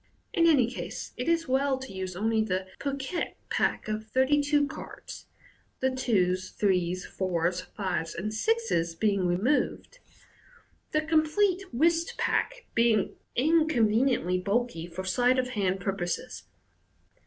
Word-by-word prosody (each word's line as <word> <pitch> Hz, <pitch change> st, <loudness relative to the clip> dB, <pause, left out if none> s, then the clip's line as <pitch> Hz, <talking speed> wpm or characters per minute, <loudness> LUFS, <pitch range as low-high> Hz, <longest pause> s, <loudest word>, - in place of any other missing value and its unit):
In 335 Hz, -3 st, +4 dB
any 285 Hz, -7 st, +5 dB
case, 240 Hz, +1 st, -6 dB
it 250 Hz, +6 st, -2 dB
is 335 Hz, -1 st, +1 dB
well 265 Hz, +1 st, +2 dB
to 265 Hz, -4 st, -8 dB
use 185 Hz, -1 st, -5 dB
only 220 Hz, +3 st, +1 dB
the 185 Hz, -3 st, -1 dB
piquet 280 Hz, +4 st, -3 dB, 0.2 s
pack -, -, 0 dB
of 215 Hz, 0 st, -3 dB
thirty 260 Hz, +5 st, +3 dB
two 290 Hz, 0 st, +2 dB
cards 280 Hz, -, -9 dB, 0.5 s
(the 260 Hz, 0 st, +1 dB
twos, 185 Hz, -8 st, +1 dB
threes, 185 Hz, -2 st, 0 dB
fours, 180 Hz, -1 st, -1 dB, 0.2 s
fives, 180 Hz, -5 st, -2 dB
and 210 Hz, +5 st, -3 dB
sixes 220 Hz, -, 0 dB
being 200 Hz, -1 st, +1 dB
removed), 250 Hz, -, 0 dB, 0.9 s
the 305 Hz, -, +2 dB
complete 330 Hz, +5 st, +1 dB
whist 330 Hz, +6 st, +1 dB
pack -, -, -1 dB
being 230 Hz, -3 st, +2 dB, 0.2 s
inconveniently 250 Hz, -, +2 dB
bulky 200 Hz, -3 st, -1 dB
for 175 Hz, +2 st, -6 dB
sleight 245 Hz, +7 st, +2 dB
of 255 Hz, -1 st, 0 dB
hand 195 Hz, -5 st, 0 dB
purposes. 175 Hz, -, -3 dB
230 Hz, 130 wpm, -28 LUFS, 185-290 Hz, 0.9 s, any